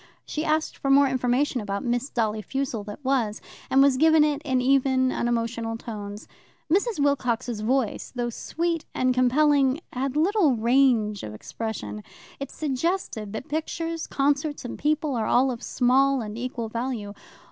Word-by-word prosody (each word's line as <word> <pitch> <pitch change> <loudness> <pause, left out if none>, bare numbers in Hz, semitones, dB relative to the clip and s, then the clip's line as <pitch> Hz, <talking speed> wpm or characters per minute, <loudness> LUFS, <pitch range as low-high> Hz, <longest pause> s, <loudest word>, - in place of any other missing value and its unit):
She 305 - -3
asked 310 0 0
for 275 - -2
more 280 +1 +6
information 255 0 0
about 200 -1 -3
Miss 245 +3 -1
Dolly 220 -2 -1
Fussell 260 0 -3
that 210 +6 -9
was, 240 -6 +1 0.3
and 270 +1 +5
was 275 -2 +4
given 315 +1 +5
it 300 -1 0
in 260 -3 +1
even, 260 0 +3
unemotional 230 -1 -1
tones. 210 -2 -7 0.5
Mrs. 405 0 +1
Wilcox's 250 -5 0
voice, 250 0 -1
though 240 -1 -2
sweet 335 +6 -2
and 255 0 +2
compelling, 270 +2 +3
had 265 +2 -2
little 335 - +3
range 230 -3 +2
of 105 0 -7
expression. 105 - -6 0.4
It 275 - -5
suggested 285 - -2
that 220 - -5
pictures, 330 +2 -3
concerts, 285 +1 0
and 245 - -5
people 300 0 0
are 225 -3 -1
all 260 +2 +3
of 240 -1 -6
small 265 +2 +2
and 210 -1 -6
equal 240 -1 -4
value. 230 -3 -4
255 Hz, 155 wpm, -25 LUFS, 230-285 Hz, 0.5 s, more